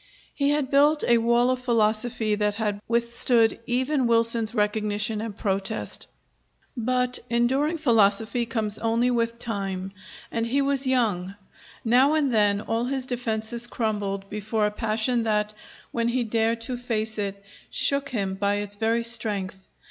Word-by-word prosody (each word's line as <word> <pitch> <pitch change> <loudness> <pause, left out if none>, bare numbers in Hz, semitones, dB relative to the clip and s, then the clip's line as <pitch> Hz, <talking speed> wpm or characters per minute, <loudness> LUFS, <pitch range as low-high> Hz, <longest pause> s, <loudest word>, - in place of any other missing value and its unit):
He 280 -1 +1
had 290 -2 0
built 295 +2 +4
a 235 -1 +5
wall 235 +2 +3
of 255 - -1
philosophy 225 -1 +1
that 210 0 0
had 205 -2 -2
withstood 235 0 +2
even 260 +2 +1
Wilson's 230 0 +1
recognition 210 0 0
and 220 -2 -6
protest. 200 +2 -3 0.7
But 250 +1 0
enduring 265 +7 +1
philosophy 225 -3 +2
comes 220 -3 -2
only 230 +2 +1
with 230 -1 0
time; 195 -5 -4 0.4
and 230 0 -1
he 270 +4 +1
was 275 -1 0
young. 205 -7 0 0.5
Now 255 +6 +4
and 285 -5 +1
then 205 -2 +3
all 225 +2 -1
his 265 0 -2
defenses 235 -1 -1
crumbled 205 -4 -2
before 210 +1 -1
a 210 - 0
passion 225 +3 0
that, 210 -1 0 0.4
when 230 0 0
he 245 +1 +1
dared 230 0 0
to 245 +2 -3
face 220 -3 -3
it, 200 -1 -4 0.3
shook 280 0 +1
him 200 -7 -2
by 200 +1 0
its 205 0 -4
very 225 +2 +1
strength. 200 -5 -2
230 Hz, 150 wpm, -25 LUFS, 210-245 Hz, 0.7 s, a